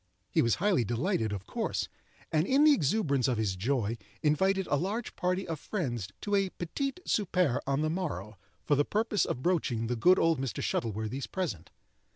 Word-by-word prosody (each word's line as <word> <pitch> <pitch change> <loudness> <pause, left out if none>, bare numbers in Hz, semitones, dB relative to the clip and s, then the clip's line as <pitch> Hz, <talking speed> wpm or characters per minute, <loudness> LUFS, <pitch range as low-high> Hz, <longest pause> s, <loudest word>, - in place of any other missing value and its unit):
He - - +3
was 115 -2 +3
highly 190 - +2
delighted, 120 - 0
of 100 -2 -5
course, - - -2 0.4
and 155 +3 +2
in 275 +3 +4
the 305 -1 +8
exuberance 145 - +1
of 125 -3 +1
his 105 -4 0
joy 115 +2 -1 0.2
invited 190 +6 +2
a 145 - +1
large 205 +10 -2
party 185 +1 -1
of 160 -3 -3
friends 125 - -3
to 205 - -3
a 195 -1 +3
petit 270 - -3
souper 180 - +2
on 140 +1 +1
the 155 - +1
morrow, 110 - -4 0.3
for - - +2
the 145 - +3
purpose 215 +4 +1
of 130 - -3
broaching 145 -10 +1
the 120 +2 -1
good 180 +11 +5
old 165 -4 +2
Mr. 135 -4 -3
Shuttleworthy's 110 +4 -2
present. 160 - -4
150 Hz, 185 wpm, -30 LUFS, 120-190 Hz, 0.4 s, the